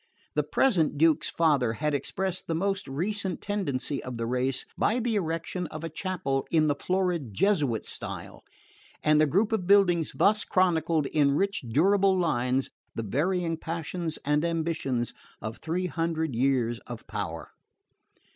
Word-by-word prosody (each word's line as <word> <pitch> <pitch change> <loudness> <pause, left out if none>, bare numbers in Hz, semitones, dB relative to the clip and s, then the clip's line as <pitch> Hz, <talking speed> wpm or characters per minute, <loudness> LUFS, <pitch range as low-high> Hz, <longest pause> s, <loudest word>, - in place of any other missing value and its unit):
The - - +2
present 170 - +2
Duke's 160 +1 +4
father 145 -8 +2
had 150 +5 -1
expressed 185 +6 -2
the 165 - -1
most 195 +3 -1
recent 185 +5 -2
tendency 150 -9 -2
of 125 -2 -6
the 115 - -2
race 125 +2 0
by 225 - +1
the 235 -1 0
erection 170 -1 -2
of 155 +1 -8
a 165 - -3
chapel 155 -7 -2
in 160 -2 +3
the 150 - +3
florid 175 - -1
Jesuit 145 - +2
style; - - -6 0.6
and 150 0 +4
the 155 - +4
group 200 +9 +2
of 200 -6 -1
buildings 180 -5 +4
thus 210 +1 +3
chronicled 165 -4 +2
in 140 0 +2
rich 200 +5 0
durable 190 - +3
lines 130 -6 0 0.2
the 115 - -2
varying 165 - 0
passions 165 0 -4
and 150 +1 +2
ambitions 160 -7 -1 0.3
of 110 +2 -6
three 175 +3 -2
hundred 165 -4 -1
years 120 -1 +1
of 120 -2 -8
power. - - -5
160 Hz, 150 wpm, -27 LUFS, 140-185 Hz, 0.6 s, Duke's